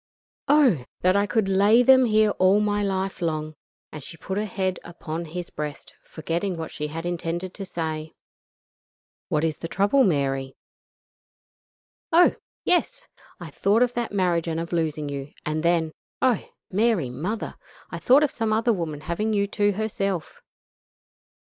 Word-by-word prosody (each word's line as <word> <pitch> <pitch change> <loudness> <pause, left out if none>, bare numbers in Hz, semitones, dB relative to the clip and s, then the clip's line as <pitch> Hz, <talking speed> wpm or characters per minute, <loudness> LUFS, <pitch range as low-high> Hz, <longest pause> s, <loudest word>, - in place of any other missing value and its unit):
Oh! 260 - +4 0.2
that 185 +1 +3
I 200 0 +2
could 200 +1 +1
lay 200 +5 +5
them 260 0 +6
here 215 -2 +3
all 185 +2 +5
my 205 0 +1
life 190 -1 -2
long," 155 -2 -2 0.4
and 150 -2 -8
she 165 - -9
put 190 +5 -3
her 215 - -1
head 185 -2 -2
upon 170 -1 -6
his 175 +2 -6
breast, 150 -1 -6
forgetting 170 +3 -3
what 160 -1 -5
she 150 - -4
had 165 +3 -6
intended 175 +1 -3
to 195 - -6
say. 160 -3 -4 1.2
"What 150 0 +1
is 160 -2 -1
the 165 - -4
trouble, 205 +10 +3
Mary?" 135 - 0 1.6
"Oh! 345 +2 +6 0.3
yes! - - +1 0.3
I 170 -3 -8
thought 205 +10 +3
of 245 -1 0
that 240 -1 -2
marriage 180 -4 +1
and 165 0 -1
of 170 +1 -5
losing 155 -3 -1
you, 140 0 -6
and 155 +1 -1
then, 165 -1 +2 0.3
oh! 255 -4 +1 0.2
Mary 200 - +1
Mother! 185 - -4 0.4
I - - -5
thought 270 +4 +5
of 295 - +1
some 225 -2 -2
other 225 +2 +2
woman 160 -6 -4
having 190 +8 -2
you 200 -1 +2
to 205 0 +1
herself. 195 -4 -3
185 Hz, 160 wpm, -24 LUFS, 160-215 Hz, 1.6 s, them